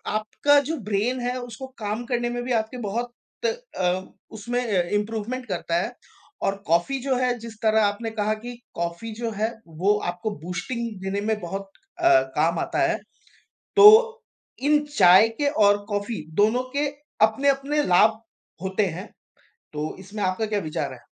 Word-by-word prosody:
आपका 285 Hz, +7 st, +3 dB
जो 325 Hz, -, -1 dB
ब्रेन 220 Hz, +5 st, 0 dB
है। 245 Hz, +1 st, -2 dB
उसको 245 Hz, +1 st, -8 dB
काम 215 Hz, +2 st, -3 dB
करने 240 Hz, 0 st, -1 dB
में 245 Hz, 0 st, -3 dB
भी 255 Hz, -, -4 dB
आपके 220 Hz, +2 st, -1 dB
बहुत 235 Hz, +4 st, -3 dB, 0.7 s
अ, 180 Hz, 0 st, +1 dB, 0.3 s
उसमें 235 Hz, +3 st, -3 dB, 0.4 s
इम्प्रूवमेंट 225 Hz, +4 st, -4 dB
करता 170 Hz, -3 st, -2 dB
है 240 Hz, -, -4 dB, 0.5 s
और 195 Hz, -, +1 dB
कॉफ़ी 175 Hz, +12 st, +2 dB
जो 265 Hz, 0 st, 0 dB
है, 250 Hz, -1 st, +1 dB
जिस 230 Hz, 0 st, -8 dB
तरह 220 Hz, 0 st, +3 dB
आपने 205 Hz, +3 st, -1 dB
कहा 215 Hz, -1 st, 0 dB
कि 245 Hz, -, -4 dB, 0.2 s
कॉफ़ी 170 Hz, +7 st, -4 dB
जो 230 Hz, -, -1 dB
है 220 Hz, +2 st, 0 dB, 0.3 s
वो 205 Hz, +2 st, +5 dB, 0.2 s
आपको 180 Hz, +5 st, -4 dB
बूस्टिंग 235 Hz, +7 st, -3 dB, 0.2 s
देने 195 Hz, +1 st, -2 dB
में 220 Hz, -1 st, 0 dB
बहुत 195 Hz, +3 st, -5 dB, 0.3 s
अ, 340 Hz, -, +4 dB, 0.3 s
काम 165 Hz, +2 st, +2 dB
आता -, -, -2 dB
है। 340 Hz, -, 0 dB, 0.8 s
तो 415 Hz, 0 st, +10 dB, 0.8 s
इन 300 Hz, 0 st, +4 dB
चाय 185 Hz, +5 st, +8 dB
के 290 Hz, -, +2 dB, 0.2 s
और 205 Hz, 0 st, +5 dB
कॉफ़ी 205 Hz, -2 st, -3 dB
दोनों 220 Hz, +5 st, +3 dB
के 290 Hz, 0 st, +2 dB, 0.4 s
अपने-अपने 275 Hz, +5 st, +1 dB
लाभ 215 Hz, +5 st, +4 dB, 0.4 s
होते 190 Hz, +2 st, +1 dB
हैं। 195 Hz, -, -7 dB, 0.7 s
तो 150 Hz, +1 st, -4 dB
इसमें 200 Hz, +2 st, -6 dB
आपका 185 Hz, +4 st, 0 dB
क्या 210 Hz, -1 st, -1 dB
विचार 150 Hz, -5 st, -3 dB
है? 125 Hz, -, -12 dB
220 Hz, 160 wpm, -24 LUFS, 195-245 Hz, 0.8 s, तो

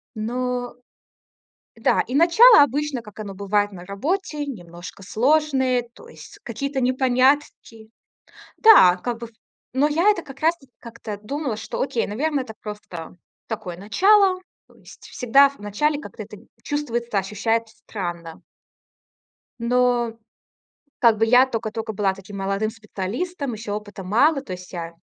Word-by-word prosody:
Но, 245 Hz, +2 st, -3 dB, 1.0 s
да, -, -, +2 dB
и 250 Hz, -, -6 dB
начало 340 Hz, -, +7 dB
обычно, 285 Hz, -1 st, -1 dB
как 210 Hz, -2 st, -12 dB
оно 200 Hz, -2 st, -6 dB
бывает 205 Hz, +1 st, 0 dB
на 180 Hz, -2 st, -10 dB
работе, 295 Hz, -, -3 dB
немножко 175 Hz, -6 st, -9 dB
сложное, 260 Hz, +2 st, +1 dB
то 470 Hz, -, -15 dB
есть 450 Hz, -, -13 dB
какие-то 270 Hz, +4 st, -3 dB
непонятки. 255 Hz, -3 st, +1 dB, 0.7 s
Да, 290 Hz, -, +7 dB
как 235 Hz, +5 st, -4 dB
бы 235 Hz, -, -7 dB
в 230 Hz, -, -21 dB, 0.5 s
но 290 Hz, +3 st, +3 dB
я 335 Hz, +7 st, +3 dB
это 410 Hz, -5 st, +2 dB
как 270 Hz, 0 st, -12 dB
раз 325 Hz, +3 st, +2 dB
таки 270 Hz, -5 st, -23 dB
как-то 230 Hz, -3 st, -8 dB
думала, 270 Hz, 0 st, -3 dB
что 220 Hz, -, -5 dB
окей, 245 Hz, -3 st, -1 dB
наверное, 275 Hz, +5 st, -1 dB
это 220 Hz, -, -9 dB
просто 185 Hz, -6 st, -8 dB, 0.3 s
такое 185 Hz, -6 st, -5 dB
начало, 370 Hz, -, +3 dB, 0.3 s
то -, -, -23 dB
есть, -, -, -16 dB
всегда 275 Hz, +3 st, +4 dB
в 280 Hz, -, -18 dB
начале 285 Hz, +9 st, -1 dB
как-то -, -, -9 dB
это -, -, -12 dB, 0.3 s
чувствуется, 240 Hz, -7 st, -2 dB
ощущается 220 Hz, +3 st, -1 dB
странно. 175 Hz, -6 st, -7 dB, 1.2 s
Но, 240 Hz, 0 st, +1 dB, 0.9 s
как 230 Hz, -4 st, +4 dB
бы 225 Hz, -, +3 dB
я 250 Hz, +3 st, +6 dB
токо-токо 225 Hz, -2 st, -4 dB
была 195 Hz, -2 st, 0 dB
таким 195 Hz, +1 st, -10 dB
молодым 195 Hz, +2 st, -1 dB
специалистом, 235 Hz, -, -5 dB
ещё 210 Hz, -1 st, -5 dB
опыта 205 Hz, -2 st, -7 dB
мало, 275 Hz, -, +3 dB
то 195 Hz, -, -8 dB
есть 180 Hz, 0 st, -9 dB
я 170 Hz, -2 st, -6 dB
235 Hz, 145 wpm, -22 LUFS, 205-280 Hz, 1.2 s, начало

